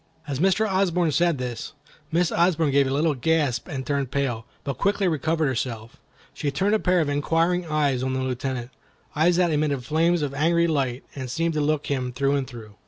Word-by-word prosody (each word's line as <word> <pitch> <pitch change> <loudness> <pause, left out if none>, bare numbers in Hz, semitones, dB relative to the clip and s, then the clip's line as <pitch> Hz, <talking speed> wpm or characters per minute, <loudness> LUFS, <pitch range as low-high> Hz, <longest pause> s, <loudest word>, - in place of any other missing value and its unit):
As 140 -2 -3
Mr. 195 +5 +3
Osborne 180 -4 +1
said 170 +1 +2
this, 125 +1 -5 0.4
Miss 170 0 +2
Osborne 165 -3 +2
gave 140 0 +3
a - - -2
little 150 +3 +2
gasp 145 -1 0
and 135 -6 -5
turned 140 -3 -1
pale, 125 -4 -2 0.2
but 140 -1 -4
quickly 200 -1 +1
recovering 160 -1 0
herself, 120 0 -4 0.4
she 145 - -2
turned 190 +9 0
a 220 - +3
pair 180 -3 +2
of 155 - 0
inquiring 165 +5 +1
eyes 145 -5 +1
on 130 0 -1
the 130 - -1
Lieutenant—eyes 130 +6 -2
that 175 -1 +2
emitted 145 -4 0
flames 165 +2 +2
of 140 -2 -2
angry 170 +4 +2
light 135 -6 -1
and 130 -2 -6
seemed 165 +5 -1
to 150 - 0
look 150 0 0
him 130 -3 -2
through 140 +3 +1
and 135 -2 -1
through. 110 -5 -11
145 Hz, 195 wpm, -24 LUFS, 130-170 Hz, 0.4 s, Mr